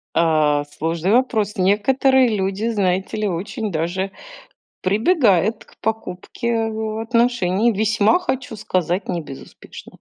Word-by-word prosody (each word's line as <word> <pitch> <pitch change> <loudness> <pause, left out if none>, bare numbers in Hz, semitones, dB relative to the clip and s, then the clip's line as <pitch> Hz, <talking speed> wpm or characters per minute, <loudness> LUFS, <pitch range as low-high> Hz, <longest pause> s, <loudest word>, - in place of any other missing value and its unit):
А, 155 -3 +2
сложный 165 +6 -2
вопрос. 220 -5 +1
Некоторые 255 +7 +3
люди, 195 +3 -1
знаете 190 -2 -1
ли, 210 -1 -1
очень 200 +4 -4
даже 175 +4 -2 0.7
прибегают 215 - +2
к - - -23
покупке 220 +2 -3 0.5
отношений. 230 -3 +2
Весьма, 215 - +2
хочу 265 -9 -4
сказать, 185 -2 -2
не 175 -2 -1
безуспешно. 135 -3 -12
200 Hz, 110 wpm, -20 LUFS, 180-230 Hz, 0.7 s, Некоторые